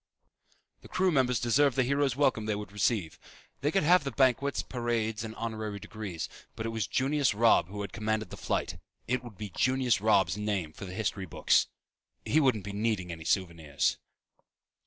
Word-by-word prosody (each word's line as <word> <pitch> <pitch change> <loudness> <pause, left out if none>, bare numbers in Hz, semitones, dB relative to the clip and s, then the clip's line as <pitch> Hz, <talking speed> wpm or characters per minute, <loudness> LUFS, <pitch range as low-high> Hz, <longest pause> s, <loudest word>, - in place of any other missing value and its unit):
The - - -13
crew 185 0 +1
members 125 -5 +2
deserved 130 +3 +3
the 130 - +3
hero's 140 0 +1
welcome 125 -6 +1
they 105 - 0
would 105 -1 -6
receive. 100 -5 0 0.4
They 145 - +1
could 195 +5 +1
have 175 +1 +5
the 140 - -2
banquets, 135 +1 +2
parades 115 -3 -2
and 110 0 -6
honorary 110 -3 -4
degrees. 100 -5 -6 0.3
But 110 - -5
it - - -1
was 110 -3 -2
Junius 135 -3 +1
Robb 110 -6 +4
who 100 +2 -6
had 100 - -6
commanded 110 -1 -2
the - - -6
flight. - - -2 0.3
It 130 +1 0
would 115 -6 -11
be 105 -2 -6
Junius 130 -5 +2
Robb's 100 -4 +3
name 100 -7 -2
for 95 - -8
the 90 -1 -7
history 100 -2 -2
books. - - +3 0.6
He 155 - +3
wouldn't 125 -9 +2
be 100 +1 -6
needing 105 -4 -1
any 80 -1 -8
souvenirs. 85 -7 0
110 Hz, 180 wpm, -29 LUFS, 100-130 Hz, 0.6 s, have